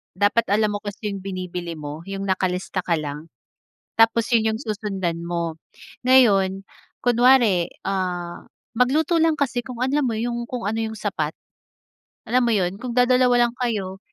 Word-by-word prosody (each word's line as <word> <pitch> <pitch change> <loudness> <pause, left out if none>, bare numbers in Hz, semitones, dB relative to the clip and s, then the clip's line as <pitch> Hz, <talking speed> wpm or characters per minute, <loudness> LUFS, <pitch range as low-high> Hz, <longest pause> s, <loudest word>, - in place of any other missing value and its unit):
dapat 205 +4 +2
alam 210 0 +2
mo 205 - -2
kasi 210 +1 -5
'yong 195 -1 -6
binibili 180 -3 -5
mo, 150 +1 -7
'yong 195 0 -4
nakalista 185 0 -1
ka 175 - +1
lang. 150 +2 -6 0.7
Tapos 225 0 +4
'yon 220 -1 +3
'yong 220 - -4
susundan 195 -6 -3
mo. 170 -1 -2 0.5
Ngayon, 195 -7 +4 0.4
kunware, 240 -7 +4 0.2
ah, 180 -3 -3 0.3
magluto 300 +7 +2
lang 325 0 +4
kasi 250 -3 0
kung 250 -3 -8
alam 280 +3 +1
mo 235 - 0
'yong 235 +1 -2
kung 245 -4 -4
ano 220 - -2
'yong 220 0 -5
sapat, 160 -8 -2 1.0
alam 255 +1 +3
mo 235 - +2
'yon. 190 -2 0
Kung 250 -2 -4
dadalawa 250 -1 +4
lang - - -12
kayo, 200 -6 -2
210 Hz, 155 wpm, -23 LUFS, 185-240 Hz, 1.0 s, Tapos